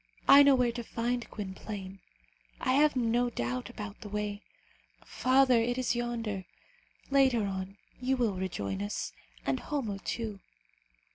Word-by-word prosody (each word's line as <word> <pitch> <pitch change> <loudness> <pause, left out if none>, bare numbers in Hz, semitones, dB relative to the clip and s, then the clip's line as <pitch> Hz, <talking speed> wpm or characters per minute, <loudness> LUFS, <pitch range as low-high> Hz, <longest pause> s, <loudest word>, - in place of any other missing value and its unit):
I 275 +1 +10
know 280 -1 +7
where 250 -2 +2
to 240 0 -5
find 240 +1 -2
Gwynplaine. 195 -1 -6 0.6
I 255 - +1
have 295 +2 +4
no 240 0 +2
doubt 125 - -3
about 210 -1 -8
the 210 - -7
way. 210 0 -3 0.6
Father, 255 -1 +4
it 245 +2 0
is 255 -1 0
yonder. 230 -5 -2 0.7
Later 260 -6 +4
on, 195 0 -4 0.2
you 260 +1 +1
will 235 -5 +1
rejoin 100 - -3
us, 100 0 -3 0.3
and 135 -1 0
Homo, 230 -10 -3
too." 220 -4 -3
230 Hz, 140 wpm, -30 LUFS, 195-250 Hz, 0.7 s, I